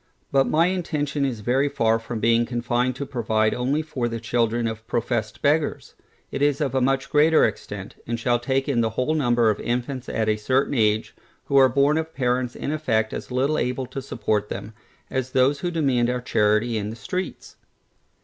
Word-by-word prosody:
But 135 -1 +3
my 165 +2 +3
intention 155 -6 -1
is 120 -5 -3
very 130 +6 +1
far 115 -3 +1
from 115 0 -5
being 115 +2 +3
confined 120 +1 0
to 140 - -4
provide 110 -4 0
only 135 +5 0
for 140 -6 -2
the 115 0 -4
children 115 +1 0
of 110 0 -4
professed 115 -2 -2
beggars: 150 +1 +1 0.4
it - - -4
is 145 -1 +2
of 140 -4 -1
a 130 - +1
much 135 +1 +1
greater 155 +2 +5
extent, - - -5
and 115 0 -2
shall 120 +1 +1
take 135 +2 -1
in 130 -5 +1
the 115 - +1
whole 125 +7 -1
number 120 -6 +3
of 105 - -4
infants 125 +1 -3
at 110 -1 -1
a 110 0 +2
certain 130 +7 +1
age, 110 -3 +1 0.3
who 140 - +1
are 135 -1 +7
born 140 +4 +3
of 160 0 -6
parents 125 -1 0
in - - -3
effect 110 -8 0
as - - -6
little 135 +4 +1
able 125 +1 -1
to 135 - -6
support 105 -5 -2
them, 110 - -6 0.4
as 130 -1 -2
those 135 +2 +3
who 175 - -2
demand 135 -8 +1
our 125 0 -1
charity 110 -1 +1
in 105 0 -4
the 110 - -6
streets. 180 - -5
125 Hz, 195 wpm, -24 LUFS, 115-140 Hz, 0.4 s, are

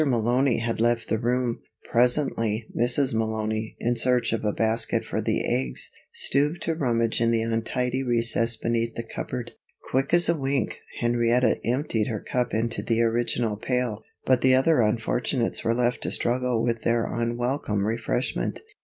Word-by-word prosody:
Malony 125 0 +2
had 115 -1 -2
left 120 0 +1
the 110 - 0
room. 120 0 0 0.3
Presently, 120 -3 +1
Mrs. 125 +2 +2
Malony, 110 0 -2
in 120 +1 0
search 125 0 +2
of 115 - -2
a 105 - +1
basket 110 +1 0
for - - -2
the - - -1
eggs, 65 -1 -1 0.2
stooped 145 +5 +1
to 165 - 0
rummage 115 -7 0
in 115 - +3
the 115 -1 +1
untidy 120 +3 -1
recess 115 -2 +3
beneath 115 0 -1
the 115 - -4
cupboard. 120 +1 -6 0.4
Quick 135 +1 0
as 175 0 +5
a 170 - +3
wink, 135 -2 -2 0.2
Henrietta 120 +1 +2
emptied 120 -3 0
her 110 -4 -3
cup 125 +3 -2
into 115 +2 -1
the 115 -1 0
original 115 -1 0
pail, 125 -2 -2 0.2
but 130 -2 +3
the 130 0 +5
other 135 +1 +3
unfortunates 115 +3 0
were 115 - +1
left 125 0 0
to - - 0
struggle 125 -1 0
with 115 -2 -1
their 115 0 +1
unwelcome 120 -2 -1
refreshment. 110 - -2
120 Hz, 160 wpm, -25 LUFS, 115-125 Hz, 0.4 s, as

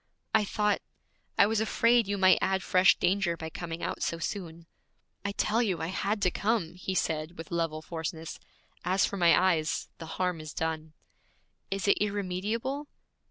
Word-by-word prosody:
'I 220 -1 +4
thought 210 0 +1 0.6
I - - +7
was 220 +1 +1
afraid 230 0 +3
you 200 0 -1
might 185 -1 +6
add 190 -1 +1
fresh 185 +1 +5
danger 180 -3 +1
by 160 0 -6
coming 170 0 -6
out - - -3
so 165 - -1
soon.' 170 -1 -5 0.6
'I 200 - -1
tell 215 +3 +1
you 195 -7 0
I 160 - -3
had 200 +2 -1
to 180 - +3
come!' 205 -6 0
he 185 +1 -4
said 160 0 -1
with 165 +1 -8
level 165 -2 -1
forcefulness. 160 0 -5 0.4
'As 185 +2 +3
for 200 - -4
my 170 -2 +5
eyes, 165 -4 +1
the 165 - -7
harm 180 -3 0
is 155 -1 -9
done.' 160 -1 -3 0.8
'Is 195 +1 -2
it 200 - +4
irremediable?' 210 +8 -2
185 Hz, 170 wpm, -29 LUFS, 165-205 Hz, 0.8 s, I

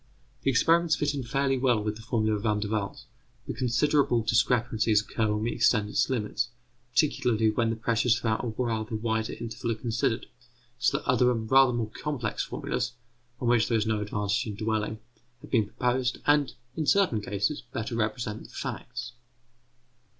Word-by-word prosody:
The - - +1
experiments 165 +5 +4
fit 145 0 0
in 140 - -3
fairly 135 +2 0
well 125 -4 +3
with 105 0 -2
the 110 - -10
formula 110 -2 0
of 105 - -4
Van 105 -1 +1
der 105 -1 -3
Waals, 105 -2 -3 0.4
but - - -5
considerable 125 0 +2
discrepancies 115 -2 +2
occur 110 0 -1
when 105 0 -1
we 115 - 0
extend 105 -3 +2
its - - +1
limits, 120 -1 -1 0.4
particularly 125 -5 +2
when 115 +1 +1
the 115 - 0
pressures 115 0 +2
throughout 115 -2 -1
a - - -2
rather 110 -1 -2
wider 110 0 -1
interval 115 0 -3
are - - -5
considered; 115 0 -1 0.5
so 125 +3 +2
that - - -8
other 125 -1 +4
and 110 -3 -2
rather 135 -1 +7
more 115 -2 -2
complex 125 -4 -3
formulas, 125 0 -3 0.5
on 120 - -2
which 120 -2 +4
there 115 - +2
is 110 - 0
no 110 -1 0
advantage 105 +2 -1
in 105 - -4
dwelling, 110 0 -1 0.4
have - - -13
been 110 -5 +3
proposed, 125 +2 0
and, 145 -2 +3 0.2
in 155 -2 -2
certain 185 - +3
cases, 105 +8 -1
better 120 -2 -4
represent 110 -1 -2
the - - -13
facts. - - -5
115 Hz, 180 wpm, -28 LUFS, 110-125 Hz, 0.5 s, rather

